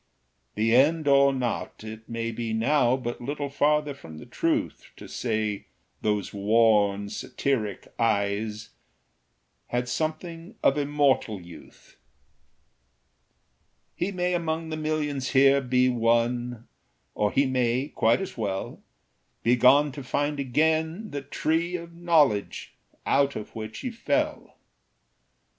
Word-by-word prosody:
The 115 +2 +2
end 150 +4 +3
or 140 0 +6
not, 125 -4 -3
it 110 0 -9
may 115 0 -3
be 115 0 -4
now 125 +2 +2
But 120 -2 -5
little 145 +3 -3
farther 150 +1 +1
from 80 - -12
the - - -10
truth - - -2
To - - -10
say 110 -4 -2 0.3
those 105 -2 -1
worn 105 -1 +3
satiric 110 -2 -2
eyes 105 0 0 1.0
Had 125 0 -2
something 165 - -4
of 135 - +4
immortal 140 -7 +1
youth. 85 -1 -15 2.0
He 185 +3 -2
may 180 -1 -1
among 165 -1 -2
the 155 - -3
millions 150 -4 -2
here 140 +1 +6
Be 125 0 +2
one; 120 0 0 0.5
or 105 -1 0
he 140 - +3
may, 130 +1 0
quite 115 +11 +2
as 190 - -6
well, 100 -4 -4 0.6
Be 120 +2 +4
gone 135 +4 +5
to 140 +1 -8
find 145 +3 -1
again 160 - 0
the 145 -1 -4
Tree 165 +5 -1
Of 170 -1 -7
Knowledge, 160 -11 +1 0.3
out 140 0 +2
of 105 - -7
which 110 0 -6
he 255 - -3
fell. 295 +6 -2
130 Hz, 125 wpm, -26 LUFS, 110-150 Hz, 2.0 s, or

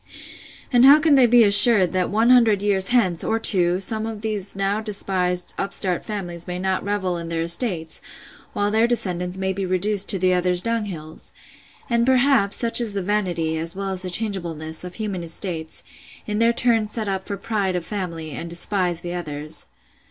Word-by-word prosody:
—And 245 0 +5
how 280 +3 +8
can 310 -1 +2
they 260 -3 +5
be 240 0 +5
assured, 200 -2 +7
that 185 -1 -1
one 225 +4 +2
hundred 225 -5 +3
years 195 -2 +1
hence, 195 -9 +1
or 225 - -1
two, 180 -5 +3
some 220 +2 -1
of 220 -1 -8
those 210 -3 -3
now 195 +2 -1
despised 185 -4 -1
upstart 190 -2 -2
families 175 -5 -7
may 180 0 -5
not 190 0 -2
revel 190 -3 -2
in 170 0 -7
their 165 -1 -2
estates, 170 -2 0 0.5
while 205 0 -1
their 220 +2 +2
descendants 185 -6 -2
may 190 0 -2
be 195 +1 -4
reduced 190 +2 -1
to 195 - +3
the 185 0 +1
others' 180 0 +1
dunghills!—And, 215 +2 -5
perhaps, 260 -5 +2
such 235 0 +4
is 220 -4 -4
the 195 - -2
vanity, 175 -6 -2
as 165 +3 -5
well 195 0 -4
as 185 -1 -3
changeableness, 170 -7 -3
of 180 0 -9
human 205 -5 -5
estates, 165 -1 -5 0.4
in 210 0 -3
their 230 +1 +3
turns 230 -3 0
set 220 -2 -2
up 190 -1 -3
for 200 - -6
pride 195 -2 -2
of 175 -2 -4
family, 170 -6 -6
and 170 +4 -7
despise 175 0 -1
the 175 0 -6
others! 155 -3 -6
195 Hz, 180 wpm, -21 LUFS, 175-215 Hz, 0.5 s, how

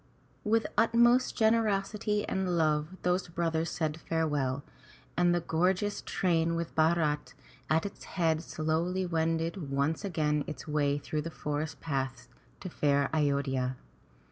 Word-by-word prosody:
*' - - -35
With 225 0 +3
utmost 240 +2 +4
generosity 215 -1 +1
and 185 -2 0
love 155 +2 +1
those 180 +1 +1
brothers 165 -1 -1
said 155 -2 -2
farewell, 145 -5 -1 0.5
and 175 0 +3
the 175 0 +2
gorgeous 185 +5 0
train 165 -2 +1
with 170 0 -3
Bharat 155 -4 +1 0.3
at 160 +3 +2
its 200 - -7
head, 160 -3 0
slowly 165 +4 -1
wended 165 -1 -1
once 140 +6 0
again 150 -6 0
its 150 -2 -7
way 145 -1 +1
through 150 +1 -3
the 165 - -5
forest 150 0 -4
paths 135 -5 -3 0.3
to - - -5
fair 140 -2 +1
A 160 - +2
yod'hya. 135 -3 0
160 Hz, 140 wpm, -30 LUFS, 150-180 Hz, 0.5 s, utmost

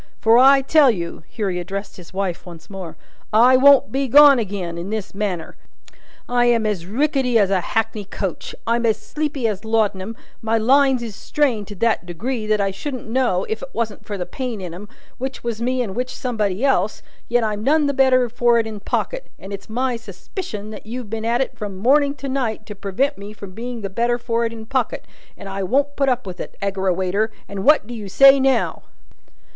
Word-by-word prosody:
For, 225 +2 +5
I 270 +1 +6
tell 290 0 +5
you," 170 -7 -3
here 205 -4 -3
he 180 - -2
addressed 195 +3 -6
his 180 -3 -13
wife 190 -2 -3
once 170 0 -12
more, 185 -4 -7 0.3
"I 240 +4 +6
won't 275 -4 +6
be 270 +2 0
gone 285 0 +8
agin, 190 -5 -4
in 175 +3 -5
this 215 -2 -4
manner. 195 -5 -3 0.7
I 245 0 +2
am 235 -2 +3
as 190 -5 -2
rickety 265 +1 +1
as 200 -3 +3
a 190 -2 +2
hackney 220 +1 -2
coach, 190 -2 -5
I'm 235 +1 +1
as 220 - +2
sleepy 285 +2 -2
as 205 -2 -3
laudanum, 220 -2 0 0.3
my 225 0 +1
lines 265 +2 +3
is 220 -4 -6
strained 240 -9 0
to 205 - -8
that 220 -3 0
degree 215 +6 -3
that 215 -1 +2
I 195 -1 +1
shouldn't 255 +5 -6
know, 230 -7 +1
if 220 0 -4
it - - -7
wasn't 225 -3 -3
for 205 - -5
the 180 - -3
pain 250 -2 -5
in 180 -3 -6
'em, 205 +4 -9 0.3
which 265 +1 -5
was 235 -1 -3
me 250 +1 0
and 195 -5 -6
which 250 +1 -3
somebody 215 -3 -1
else, 215 -6 +1 0.3
yet 240 0 +2
I'm 210 -1 -2
none 300 +4 +3
the 280 - +1
better 260 -2 +4
for 240 0 +2
it 230 - +1
in 220 -2 -6
pocket; - - -3
and 195 +1 -9
it's 200 +1 -8
my 250 +2 -1
suspicion 215 - -7
that 210 0 -10
you've 235 -2 -6
been 225 0 -3
at 235 +2 +1
it 265 - -2
from 205 -3 -6
morning 280 +7 +3
to 275 0 -6
night 245 -5 -2
to 210 - -7
prevent 205 +8 -1
me 205 +1 -8
from 200 -2 -10
being 235 +3 -6
the 200 - -3
better 235 +5 0
for 235 -1 -1
it 230 - -2
in 225 -1 -9
pocket, 260 0 -2 0.3
and 200 - -9
I 195 0 -4
won't 280 +9 +1
put 275 -1 +2
up 250 -2 0
with 185 -1 -7
it, - - -8
Aggerawayter, 190 +1 0 0.2
and 195 -1 -5
what 300 -4 +5
do 240 - -8
you 210 -4 -7
say 275 +7 +7
now!" 270 0 +1
225 Hz, 215 wpm, -21 LUFS, 200-255 Hz, 0.7 s, gone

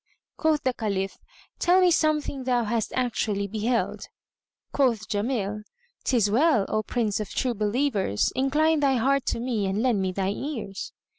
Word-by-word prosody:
Quoth 310 -2 +1
the 255 - +1
Caliph, 195 -5 -3 0.4
"Tell 360 +2 +4
me 365 -1 +5
something 300 -4 +1
thou 245 -2 +2
hast 225 0 -1
actually 220 -5 0
beheld." 220 +4 -1 0.6
Quoth 235 -7 +1
Jamil, 210 -1 -2 0.4
"'Tis 235 -6 +3
well, 255 -3 +3
O 215 - +1
Prince 215 -2 -1
of 210 - -4
True 250 -2 -1
Believers; 210 - 0
incline 300 +4 +2
thy 275 -2 +3
heart 270 +3 +1
to - - 0
me 230 -5 -1
and 200 +4 -1
lend 235 -6 +2
me 190 -1 0
thine 195 +1 -1
ears." 230 -9 -5
235 Hz, 155 wpm, -26 LUFS, 205-270 Hz, 0.6 s, me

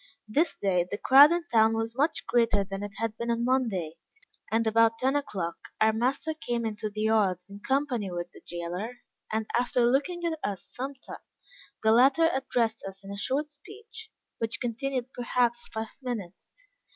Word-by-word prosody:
This 300 +11 +1
day 185 -3 +2
the 205 - -3
crowd 275 +7 +8
in 345 0 +1
town 225 -1 +5
was 225 0 -2
much 290 +5 0
greater 230 -4 +2
than 195 0 -6
it 205 -1 -6
had 225 0 -2
been 235 0 -3
on 235 0 0
Monday; 215 -11 0 0.5
and, 225 +1 +2
about 225 +1 +4
ten 265 +4 +1
o'clock 190 -12 -2 0.2
our 220 0 +4
master 260 +7 0
came 240 -7 -3
into 215 0 -3
the 215 +1 -5
yard 215 -4 +3
in 200 0 -11
company 260 -4 0
with 175 0 -5
the - - -15
jailor, 175 +7 -5 0.4
and 220 0 0
after 245 0 +2
looking 290 +8 +1
at 320 -2 -1
us 200 -2 -3
some 270 +3 -6
time, 265 - -10 0.7
the 220 - +5
latter 270 +8 +5
addressed 240 -4 0
us 195 0 -7
in 195 - -7
a - - -5
short 280 +9 -1
speech, 435 +8 -11 0.3
which 225 0 -2
continued 255 +1 -3
perhaps 240 -1 0
five 220 0 -6
minutes. 220 -8 -6
230 Hz, 175 wpm, -28 LUFS, 210-265 Hz, 0.7 s, crowd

